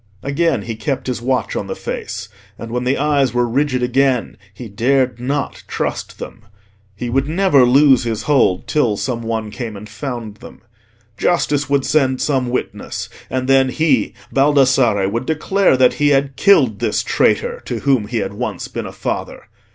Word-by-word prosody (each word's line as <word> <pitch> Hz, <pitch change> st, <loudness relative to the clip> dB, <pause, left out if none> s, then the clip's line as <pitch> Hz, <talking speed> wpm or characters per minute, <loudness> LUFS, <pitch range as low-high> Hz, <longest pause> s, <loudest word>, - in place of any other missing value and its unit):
Again 140 Hz, -4 st, 0 dB
he 115 Hz, -, -4 dB
kept 130 Hz, +4 st, -3 dB
his 125 Hz, -3 st, -3 dB
watch 125 Hz, -2 st, -1 dB
on -, -, -3 dB
the -, -, -4 dB
face. 105 Hz, +2 st, -5 dB, 0.3 s
And 115 Hz, -, -8 dB
when 125 Hz, +1 st, -2 dB
the 130 Hz, +2 st, +1 dB
eyes 140 Hz, -4 st, +1 dB
were 120 Hz, 0 st, +2 dB
rigid 130 Hz, +1 st, 0 dB
again, 130 Hz, 0 st, +1 dB, 0.2 s
he 115 Hz, +4 st, -9 dB
dared 125 Hz, +4 st, +1 dB
not 140 Hz, +3 st, -3 dB
trust -, -, -4 dB
them. 115 Hz, -, -9 dB, 0.5 s
He 120 Hz, +4 st, -5 dB
would 135 Hz, +4 st, 0 dB
never 165 Hz, -6 st, +4 dB
lose 135 Hz, +1 st, +5 dB
his 115 Hz, -2 st, -3 dB
hold 130 Hz, -11 st, +2 dB
till 120 Hz, -9 st, +1 dB
some 120 Hz, 0 st, -3 dB
one 110 Hz, -2 st, -3 dB
came 110 Hz, -2 st, -6 dB
and 105 Hz, +2 st, -10 dB
found 120 Hz, -4 st, -6 dB
them. -, -, -13 dB, 0.6 s
Justice 145 Hz, -5 st, +1 dB
would 140 Hz, -1 st, +1 dB
send 130 Hz, -4 st, +2 dB
some 130 Hz, -4 st, 0 dB
witness, 125 Hz, -, -4 dB, 0.2 s
and 130 Hz, 0 st, -2 dB
then 135 Hz, -1 st, +4 dB
he, 135 Hz, -8 st, +1 dB, 0.2 s
Baldassarre, 130 Hz, -7 st, +3 dB
would 115 Hz, +5 st, -3 dB
declare 160 Hz, 0 st, +2 dB
that 125 Hz, -1 st, +4 dB
he 145 Hz, -, +4 dB
had 135 Hz, -1 st, +1 dB
killed 200 Hz, 0 st, +4 dB
this -, -, 0 dB
traitor, 480 Hz, 0 st, +1 dB
to -, -, -4 dB
whom 130 Hz, -7 st, +2 dB
he 120 Hz, +2 st, -3 dB
had 110 Hz, -, -2 dB
once -, -, -4 dB
been -, -, -5 dB
a -, -, -8 dB
father. -, -, -4 dB
130 Hz, 175 wpm, -18 LUFS, 115-140 Hz, 0.6 s, lose